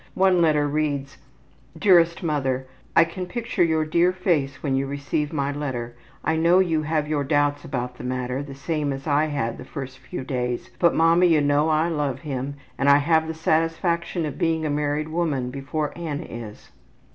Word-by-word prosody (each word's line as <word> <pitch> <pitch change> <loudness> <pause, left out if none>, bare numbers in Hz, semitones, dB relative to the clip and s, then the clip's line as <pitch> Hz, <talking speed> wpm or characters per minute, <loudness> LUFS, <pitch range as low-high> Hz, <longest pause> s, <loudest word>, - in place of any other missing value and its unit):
One 185 -2 +4
letter 150 -3 +3
reads, 145 -2 -2 0.6
``Dearest 170 -3 +4
Mother: 135 -5 -1 0.3
I 165 - +8
can 180 +2 -5
picture 230 -1 -1
your 160 -2 +2
dear 170 +3 +3
face 160 -8 -1
when 135 -3 0
you 135 +1 0
receive 140 +1 -2
my 140 -3 -1
letter. 130 -5 -4 0.3
I 160 - +1
know 170 +3 +4
you 170 -4 +2
have 155 0 -1
your 150 -2 0
doubts 145 0 +1
about 125 -1 -4
the - - -7
matter, 125 +1 -2
the 140 -1 -8
same 145 0 -2
as 135 0 -7
I 150 0 +2
had 140 -7 -2
the - - -7
first 130 -2 -7
few 130 0 -6
days. 125 -2 -3
But 170 - +4
mama, 165 +2 +5
you 165 -3 +4
know 145 +2 +2
I 155 +1 +2
love 145 -5 -2
him 140 -1 -4 0.2
and 135 +2 +3
I 140 - +8
have 160 +2 +2
the 160 - -4
satisfaction 165 +1 0
of 145 -1 -5
being 160 -1 +1
a 150 - 0
married 150 +1 -1
woman 150 -7 -1
before 145 +3 -3
Annie 165 -2 -4
is.'' 115 -3 -9
150 Hz, 190 wpm, -24 LUFS, 135-165 Hz, 0.6 s, I